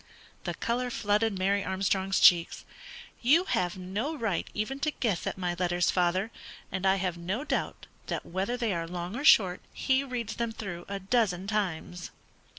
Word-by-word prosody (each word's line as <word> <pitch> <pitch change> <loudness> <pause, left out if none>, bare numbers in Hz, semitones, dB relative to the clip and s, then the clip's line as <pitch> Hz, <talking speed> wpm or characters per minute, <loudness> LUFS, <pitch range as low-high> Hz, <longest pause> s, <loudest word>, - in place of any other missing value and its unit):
'" - - -28
The - - -2
colour 245 +2 -1
flooded 210 -2 +1
Mary 200 +2 +1
Armstrong's 190 0 0
cheeks. 175 -3 +5 0.6
"You 295 +9 +5
have 180 - 0
no 205 - -3
right 220 -9 -1
even 240 +6 -3
to 305 - +1
guess 225 - -1
at - - -3
my 180 -2 -1
letters, 175 -1 +2
father, 185 +4 +1 0.4
and 190 0 -1
I 190 - +5
have 185 -3 -2
no 190 +10 -2
doubt - - -2 0.2
that - - -3
whether 195 +7 -2
they 230 -5 0
are 165 -1 -2
long 175 +3 -5
or 275 - -4
short, 190 -10 +6
he 265 0 +2
reads 240 -5 -4
them 235 -1 -1
through 175 -6 -6
a 200 - -3
dozen 195 -3 +1
times." 180 -4 -2
195 Hz, 175 wpm, -29 LUFS, 180-230 Hz, 0.6 s, short